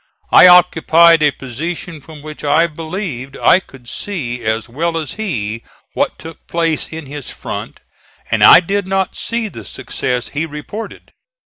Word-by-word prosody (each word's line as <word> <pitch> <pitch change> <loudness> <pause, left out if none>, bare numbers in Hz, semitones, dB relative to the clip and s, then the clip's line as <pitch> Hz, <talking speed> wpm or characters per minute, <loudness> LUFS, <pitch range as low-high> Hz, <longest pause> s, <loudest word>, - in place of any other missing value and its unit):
I - - +9
occupied 170 -2 +6
a 150 - +5
position 150 +5 -6
from 150 0 -13
which 155 -1 -9
I 150 +3 +3
believed 155 - -6
I - - +5
could 135 -9 -17
see 125 - -5
as 110 +1 -1
well 165 +7 -2
as 155 -3 -4
he 115 - -4 0.3
what - - -1
took 165 0 -12
place 165 -2 -1
in 160 -1 -7
his 140 -1 -8
front, - - -7 0.5
and - - +2
I - - +9
did 195 +2 -2
not 190 0 -1
see 230 -1 -2
the 115 - -9
success 125 +4 -4
he 150 +3 -3
reported. 155 +9 -8
160 Hz, 155 wpm, -16 LUFS, 135-175 Hz, 0.5 s, I